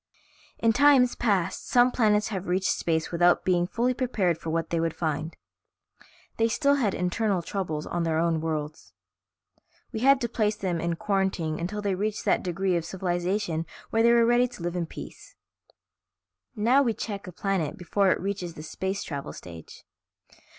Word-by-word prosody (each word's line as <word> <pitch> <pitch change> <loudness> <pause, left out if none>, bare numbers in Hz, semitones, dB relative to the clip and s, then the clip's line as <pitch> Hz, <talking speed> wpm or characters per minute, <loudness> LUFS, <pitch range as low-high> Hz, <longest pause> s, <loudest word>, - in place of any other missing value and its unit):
"In 230 -1 +2
times 275 -2 +5
past 200 -7 -1
some 245 0 +5
planets 210 -4 +2
have 190 -3 -4
reached 185 +2 +1
space 160 -1 -1
without 175 +1 +3
being 175 -1 +2
fully 240 +5 0
prepared 205 - 0
for 165 - -6
what 165 0 -2
they 170 - +1
would 165 -1 -1
find. 160 0 -3 1.0
They 225 - +3
still 280 +5 +2
had 215 -8 0
internal 180 +1 0
troubles 165 -6 -3
on 175 - -2
their 165 -1 0
own 165 -1 +1
worlds. 155 -1 -4 1.0
We 220 - -4
had 270 +3 +5
to 235 - 0
place 215 -2 0
them 180 -5 -2
in 170 0 -1
quarantine 190 -5 -1
until 205 +5 -4
they 200 -1 0
reached 210 +3 -2
that - - +2
degree 185 +1 -1
of 170 - 0
civilization 175 -1 -2 0.2
where 225 - +2
they 235 +1 +5
were 235 -1 +5
ready 240 +1 +4
to 235 -8 -11
live 175 0 -2
in 170 -2 -2
peace. - - -11 1.2
Now 240 +6 +4
we 235 -5 +1
check 200 -3 -5
a - - -6
planet 185 -3 -2
before 195 +2 +1
it - - +2
reaches 190 -3 -4
the 155 - -8
space 190 +5 -3
travel 140 -3 -6
stage. 85 -2 -11
190 Hz, 175 wpm, -26 LUFS, 170-220 Hz, 1.2 s, times